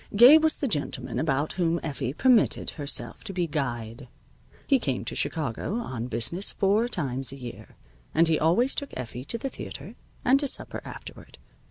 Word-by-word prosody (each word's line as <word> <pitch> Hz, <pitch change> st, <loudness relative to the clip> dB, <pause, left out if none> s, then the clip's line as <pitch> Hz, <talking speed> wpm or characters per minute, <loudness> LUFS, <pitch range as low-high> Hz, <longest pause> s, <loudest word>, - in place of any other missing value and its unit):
Gabe 255 Hz, +9 st, +9 dB
was 315 Hz, -1 st, +2 dB
the 280 Hz, -, -1 dB
gentleman 150 Hz, -, 0 dB
about 150 Hz, -1 st, 0 dB
whom 170 Hz, -2 st, 0 dB
Effie 135 Hz, -3 st, -3 dB
permitted 240 Hz, -, +3 dB
herself 145 Hz, -3 st, -3 dB
to 210 Hz, -, -3 dB
be 180 Hz, -1 st, 0 dB
guyed. 125 Hz, -5 st, -4 dB, 0.6 s
He 275 Hz, -2 st, +3 dB
came 135 Hz, -, -2 dB
to -, -, -2 dB
Chicago 155 Hz, -, 0 dB
on 130 Hz, -, -4 dB
business 125 Hz, -, 0 dB
four 205 Hz, +4 st, +2 dB
times 135 Hz, -, -2 dB
a -, -, -8 dB
year, 125 Hz, -3 st, -10 dB, 0.4 s
and 165 Hz, +1 st, +4 dB
he 160 Hz, -1 st, +2 dB
always 220 Hz, -, +3 dB
took 280 Hz, -, -2 dB
Effie 125 Hz, 0 st, -6 dB
to 230 Hz, -, -2 dB
the 270 Hz, +4 st, -4 dB
theater, -, -, -8 dB, 0.3 s
and 265 Hz, +2 st, +5 dB
to 285 Hz, -, -1 dB
supper -, -, -4 dB
afterward. -, -, -11 dB
160 Hz, 175 wpm, -26 LUFS, -, 0.6 s, Gabe